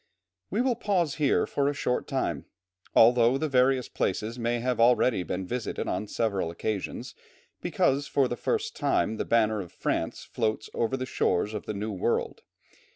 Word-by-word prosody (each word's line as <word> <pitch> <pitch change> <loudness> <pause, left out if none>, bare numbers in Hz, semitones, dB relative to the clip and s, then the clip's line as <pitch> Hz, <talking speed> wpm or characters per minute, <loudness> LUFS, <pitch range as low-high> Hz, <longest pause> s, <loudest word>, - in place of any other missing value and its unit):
We 210 +6 0
will 255 -1 +2
pause 185 -10 0
here 140 - +3
for 140 0 0
a 145 - -3
short 125 - -1
time, - - -2 0.5
although 120 +2 +6
the 155 - -1
various 130 -1 +3
places 110 +5 -2
may 120 +1 0
have 125 0 -1
already 120 -2 +4
been 90 +1 -3
visited 120 +4 -3
on 105 - -2
several 100 -6 -1
occasions, 100 +4 -4 0.5
because 140 +1 +1
for 135 -2 +2
the 120 - -3
first 445 - -2
time 110 - +1
the - - -2
banner 110 -2 +2
of 90 - -9
France - - -2
floats 110 -2 -2
over 120 +3 0
the 130 - -3
shores 105 -4 0
of 105 - -5
the 105 - -3
New 105 +2 -3
World. 95 - -1
120 Hz, 170 wpm, -27 LUFS, 110-135 Hz, 0.5 s, although